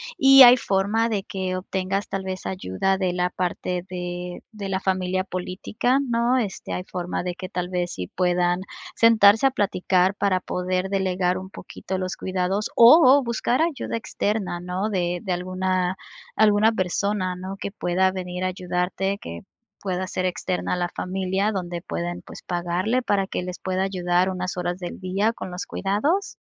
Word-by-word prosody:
¿y 270 -4 +9
hay 245 +1 +9
forma 210 +3 +1
de 200 -3 -1
que 185 -2 -3
obtengas 190 +1 -2
tal 195 -1 -4
vez, 185 0 -5
ayuda 190 - -1
de 185 -2 0
la 180 0 0
parte 180 0 -2
de 180 0 -5
de 200 -3 -6
la 190 0 0
familia 185 0 0
política, 195 +8 -1
no?, 240 +2 +2
este, 210 -6 -3
¿hay 180 - -3
forma 180 -1 -4
de 180 -1 -3
que 185 +1 -7
tal 180 -2 -3
vez 175 -1 -2
sí 90 -1 -5
puedan 180 0 +1 0.3
sentarse 225 +1 +6
a - - +1
platicar 190 -3 +1
para 195 -2 +1
poder 185 +1 -2
delegar 185 -2 0
un 190 0 -9
poquito 190 -1 -6
los 185 0 -3
cuidados, 190 +3 -1
o 245 +9 +9
o 270 +1 +6
buscar 235 +3 0
ayuda 305 -7 -2
externa, 205 -5 -2
no, 180 +4 -3
de 175 -3 -1
de 185 -3 -1
alguna 185 0 -1 0.4
alguna 215 +1 +4
persona, 185 -1 -1
no, 190 +2 -7
que 200 - -5
pueda 185 -1 +1
venir 180 -1 -5
a - - +1
ayudarte 185 +2 -2
que 85 0 -7 0.4
pueda 185 -1 -2
ser 185 - -2
externa 180 0 -1
a - - -4
la 175 0 0
familia 190 +3 -1
donde 175 -3 -4
pueden, 175 +1 -4
pues, - - -11
pagarle 180 +8 -1
para 195 -4 0
que - - -3
les 180 0 -6
pueda 185 0 -1
ayudar 180 -1 +1
unas 185 0 -3
horas 180 0 -3
del 175 +1 -7
día 200 +5 0
con 185 - -7
los 180 - -5
cuidados? 290 - -1
185 Hz, 175 wpm, -24 LUFS, 180-200 Hz, 0.4 s, y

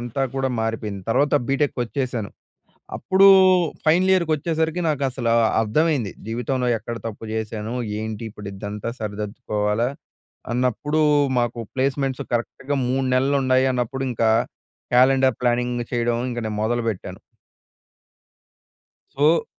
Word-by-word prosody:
అంతా 120 +3 -3
కూడా 135 0 0
మారిపోయింది. 110 -3 -3
తర్వాత 140 +5 +2
బీటెక్‌కొచ్చేసాను. 130 -4 -1 0.7
అప్పుడు 190 +1 +4 0.6
ఫైనల్ 185 +4 +4
ఇయర్‌కి 170 -4 +2
వచ్చేసరికి 160 +2 -1
నాకు 145 -3 -1
అసలు 120 -3 -2 0.3
అర్థమైంది. 130 - +1
జీవితంలో 125 +2 -1
ఎక్కడ 115 +2 -6
తప్పు 110 0 -7
చేశాను? 110 +1 -4 0.3
ఏంటి 110 +1 -5
ఇప్పుడు 105 -1 -9
ఇదంతా 105 +3 -5
సరిదిద్దుకోవాలా? 105 +1 -2 0.6
అన్నప్పుడు 130 +5 0 0.4
మాకు 120 0 -1 0.2
ప్లేస్‌మెంట్స్ 135 0 -1
కరెక్ట్‌గా 130 +4 -2
3 130 +1 0
నెలలు 135 +2 +2
ఉన్నాయి 130 0 +3
అన్నప్పుడు 125 +2 -2
ఇంకా, 115 -1 +1 0.6
క్యాలెండర్ 130 -1 +4
ప్లానింగ్ 120 0 0
చేయడం 120 0 0
ఇంకా 120 - -3
నేను 105 -1 -3
మొదలుపెట్టాను. 115 -3 -2 2.0
సో 155 +4 +3
125 Hz, 110 wpm, -22 LUFS, 110-135 Hz, 2.0 s, అప్పుడు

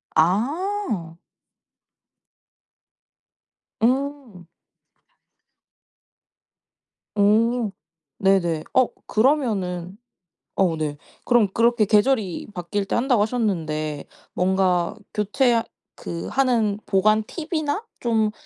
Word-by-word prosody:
아. 220 - 0 2.7
음. 260 -6 -1 2.7
어 220 +2 +3 0.5
네네. 175 -5 +2
어 255 -2 +4 0.2
그러면은 205 - 0 0.6
어 180 -4 +2
네 150 -2 -3 0.3
그럼 240 -4 +4
그렇게 235 -1 +3
계절이 210 -2 +1
바뀔 195 +3 -3
때 - - -2
한다고 245 -2 +2
하셨는데 160 - -2 0.3
뭔가 180 -2 +1 0.2
교체하 230 +3 +2 0.3
그 170 0 -6
하는 230 -6 +1
보관 215 +2 +3
팁이나 315 - -3
좀 220 -3 +1
215 Hz, 145 characters per minute, -23 LUFS, 180-245 Hz, 2.7 s, 어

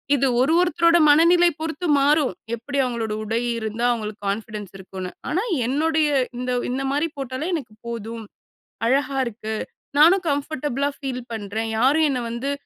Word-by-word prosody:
இது 275 0 +1 0.2
ஒரு, 280 +5 +3
ஒருத்தரோட 340 -1 +4
மனநிலை 340 +4 +6
பொறுத்து 320 +2 -4
மாறும் 290 0 +3 0.2
எப்டி 265 +5 -5
அவங்களோட 235 -4 -2
உடை 225 +2 -1 0.2
இருந்தா 220 +2 -2
அவங்களுக்கு 215 -3 -4
கான்ஃபிடன்ஸ் 210 -1 -4
இருக்குனு. 190 -1 -7 0.2
ஆனா, 355 +5 +1 0.2
என்னுடைய 310 +4 +1 0.3
இந்த 250 0 -2 0.2
இந்த 260 +2 -2
மாரி 295 +4 0
போட்டாலே 270 +4 -4
எனக்கு 250 -9 -6
போதும். 230 0 -5 0.6
அழகா 275 +1 +1
இருக்கு 220 -1 -5 0.5
நானும் 350 +4 +6
கம்ஃபர்டபுளா 285 -1 -1
ஃபீல் 260 -3 -4
பண்றேன். 220 +1 -3
யாரும் 295 +6 +4
என்ன 255 -3 -1
வந்து 240 +4 -3
260 Hz, 140 wpm, -23 LUFS, 225-300 Hz, 0.6 s, மனநிலை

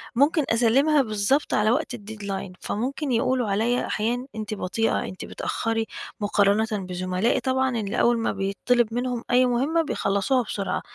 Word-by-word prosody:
ممكن 290 +5 +3
أسلّمها 265 +6 +4
بالضبط 220 +4 0
على 215 +1 +3
وقت - - -1
الdeadline 200 -3 -6
فممكن 265 +6 -2
يقولوا 250 -1 +1
عليَّ 225 +5 +1
أحيانًا 240 +4 -1
أنتِ 215 -1 -4
بطيئة، 215 +3 0
أنتِ 185 - -7
بتأخّري 225 0 -2 0.3
مقارنةً 205 +1 +2
بزملائي، 185 +1 -1
طبعًا 260 -1 0
اللي 205 -2 -2
أوّل 240 0 +4
ما 230 - 0
بيطّلب 225 +4 0
منهم 245 0 -2
أي 250 +1 +5
مهمّة 270 +7 +1
بيخلصوها 245 -3 0
بسرعة. 200 -3 -3
225 Hz, 140 wpm, -25 LUFS, 205-255 Hz, 0.3 s, أي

